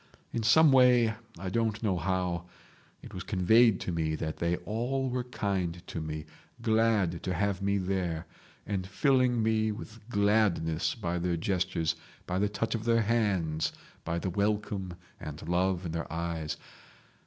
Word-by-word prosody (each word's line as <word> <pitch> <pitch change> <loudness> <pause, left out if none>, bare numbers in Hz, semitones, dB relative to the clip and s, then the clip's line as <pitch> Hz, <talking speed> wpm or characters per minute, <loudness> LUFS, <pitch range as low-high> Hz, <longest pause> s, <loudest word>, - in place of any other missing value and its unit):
In 115 - 0
some 140 +8 +6
way—I 115 -5 +3
don't 110 0 0
know 100 -4 +2
how—it 90 0 -5
was 90 - -5
conveyed 105 +3 +4
to - - -2
me 80 -2 0
that 80 0 -4
they 85 +1 +1
all 125 +5 -1
were 125 0 -2
kind 95 -7 -2
to 80 - -5
me, 75 -1 -5 0.3
glad 110 -6 +2
to 90 0 -2
have 100 +1 0
me 100 0 +1
there, 90 -3 -1 0.4
and 95 -2 -2
filling 125 0 +2
me 110 0 +2
with 110 +1 -8
gladness 100 -7 +2
by 90 -6 -2
their 85 0 0
gestures, 85 -2 0 0.3
by 90 +1 -1
the 105 +1 +2
touch 110 +2 -2
of 115 -1 -3
their 115 -1 +3
hands, 95 -9 +1 0.3
by 85 +1 -2
the 90 +2 -2
welcome 100 -2 -1 0.2
and 75 +1 -7
love 90 +1 +1
in 85 - -3
their 85 0 -4
eyes. 80 -2 -3
95 Hz, 155 wpm, -30 LUFS, 85-110 Hz, 0.4 s, some